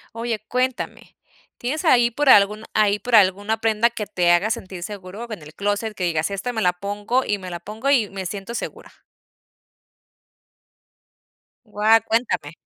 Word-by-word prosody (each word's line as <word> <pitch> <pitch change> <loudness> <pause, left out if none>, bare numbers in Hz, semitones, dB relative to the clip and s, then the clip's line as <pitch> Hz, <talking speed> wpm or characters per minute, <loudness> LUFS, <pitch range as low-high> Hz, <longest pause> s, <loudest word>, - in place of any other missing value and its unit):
Oye, 230 -2 -3
cuéntame. 255 0 -3 0.4
¿Tienes 295 +8 -3
ahí 240 -6 +5
por 285 +4 0
algún 210 0 +5
ahí 210 -1 +2
por 245 +3 -3
alguna 205 +2 +3
prenda 225 +1 +2
que 220 -3 -5
te 180 -4 +1
haga 180 +5 +2
sentir 185 -4 -5
seguro? 200 +3 -7
En 210 -7 -7
el 150 +1 -13
clóset, 205 +3 -2
que 185 - -3
digas: 160 +1 0
"Esta 200 +6 -3
me 220 -2 -2
la 180 -2 +3
pongo, 205 +7 -2
y 205 - 0
me 185 -1 -8
la 175 -1 -6
pongo, 220 +6 -3
y 240 -7 +3
me 195 -1 -6
siento 200 +5 -6
segura". - - -6 2.7
Guau, 215 +1 +3
cuéntame. 225 -10 0
210 Hz, 160 wpm, -22 LUFS, 195-230 Hz, 2.7 s, ahí